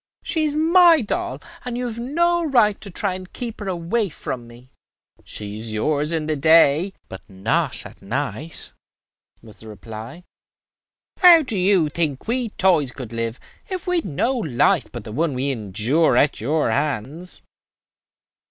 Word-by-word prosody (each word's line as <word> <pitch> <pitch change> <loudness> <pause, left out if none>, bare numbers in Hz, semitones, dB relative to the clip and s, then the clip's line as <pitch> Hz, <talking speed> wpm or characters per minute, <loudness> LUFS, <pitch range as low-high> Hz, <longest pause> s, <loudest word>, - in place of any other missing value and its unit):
"She 320 -2 0
is 295 -1 -1
my 335 0 +6
doll, 350 - -3 0.2
and 245 -1 -4
you 250 - -2
have 235 -1 -5
no 340 +7 +1
right 235 -9 +2
to 205 - -9
try 190 0 -1
to 185 - -10
keep 235 -3 -6
her 205 - -6
away 185 +4 -1
from 125 -5 -6
me." 120 +2 -16 0.5
"She 105 0 -7
is 110 0 -7
yours 150 +7 0
in 160 -2 -1
the 155 0 -1
day, 160 +4 +4
but 95 - -9
not 95 0 0
at - - -13
night," 140 +8 -4 0.7
was 110 -2 -14
the 110 - -12
reply. 110 - -9 1.0
"How 345 -4 +8
do 255 -5 -4
you 185 -3 +3
think 150 -1 -3
we 240 0 -1
toys 175 -10 +2
could 125 -4 -9
live 115 +1 -3 0.3
if 370 -1 -5
we 360 -1 +1
had 335 - -2
no 190 - 0
life 155 - +1
but - - -7
the - - -9
one 150 +4 -1
we 135 +2 -1
endure 120 - +1
at 145 -3 +2
your 145 +1 +1
hands? 145 +6 -3
160 Hz, 165 wpm, -22 LUFS, -, 1.0 s, How